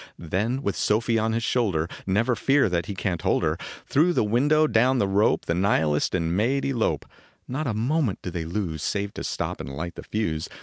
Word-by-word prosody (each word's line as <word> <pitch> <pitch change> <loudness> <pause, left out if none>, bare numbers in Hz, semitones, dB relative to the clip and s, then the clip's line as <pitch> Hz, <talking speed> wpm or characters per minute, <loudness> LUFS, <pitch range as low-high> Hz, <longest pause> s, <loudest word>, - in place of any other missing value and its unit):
Then 105 - -2
with 100 - -1
Sofie 115 +2 +1
on 110 0 0
his 115 0 -1
shoulder 100 -11 +1 0.2
Never 115 +6 +2
fear 135 -3 +3
that 85 -1 -1
he 100 - -4
can 95 -3 -2
t - - -9
hold - - +1
her - - +1 0.3
Through 165 +5 +3
the - - +2
window 145 +9 +3
down 130 -1 +3
the 100 - +2
rope, 100 +3 +2
The 85 - 0
nihilist 80 -5 +1
and 85 -1 0
maid 130 +7 +1
elope. 130 -5 0 0.4
Not 140 +4 -3
a 110 - -1
moment 125 0 0
do 90 - -4
they 85 -2 -4
lose 85 -3 -3
Save 100 +4 -2
to - - -6
stop - - -3
and 65 - -7
light 80 +6 -5
the - - -9
fuse. 85 -8 -2
105 Hz, 215 wpm, -25 LUFS, 85-125 Hz, 0.4 s, fear